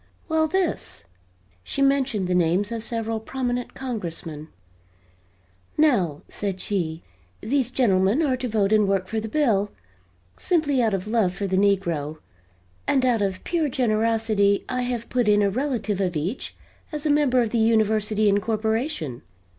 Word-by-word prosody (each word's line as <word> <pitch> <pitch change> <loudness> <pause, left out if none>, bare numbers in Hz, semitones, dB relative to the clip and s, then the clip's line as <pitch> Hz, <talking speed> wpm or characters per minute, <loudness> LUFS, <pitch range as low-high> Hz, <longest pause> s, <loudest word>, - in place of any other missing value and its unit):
"Well, 320 -1 +2
this." 365 - -2 0.6
She 275 - -1
mentioned 270 -8 +1
the 180 - 0
names 180 +4 +2
of 230 -1 -3
several 225 -1 -2
prominent 245 +1 -3
Congressmen. 165 - -5 1.3
"Now," 195 - +2
said 195 -2 -3
she, 170 -5 -2 0.4
"these 255 +2 0
gentlemen 215 +1 +2
are 270 -4 +2
to 255 - -3
vote 210 -2 +1
and 210 -2 +4
work 195 -1 +1
for 220 +4 -2
the 220 +1 -5
bill, 215 -8 +2 0.7
simply 300 -7 +1
out 220 -4 +2
of 190 0 -4
love 210 -5 +1
for 200 - -3
the 190 -1 -1
negro 170 -7 +1 0.7
and 265 -2 +2
out 240 -4 +2
of 190 -2 -2
pure 330 -4 0
generosity 220 -4 +1
I 250 0 -2
have 245 -2 -3
put 245 -3 0
in 205 0 +4
a 200 - +2
relative 235 -5 -1
of 180 -3 -1
each 170 - -3 0.4
as 300 -1 -2
a - - +2
member 290 -4 +3
of 230 -3 +1
the 235 - +1
University 215 -1 +2
incorporation. 215 - -1
220 Hz, 155 wpm, -24 LUFS, 195-255 Hz, 1.3 s, and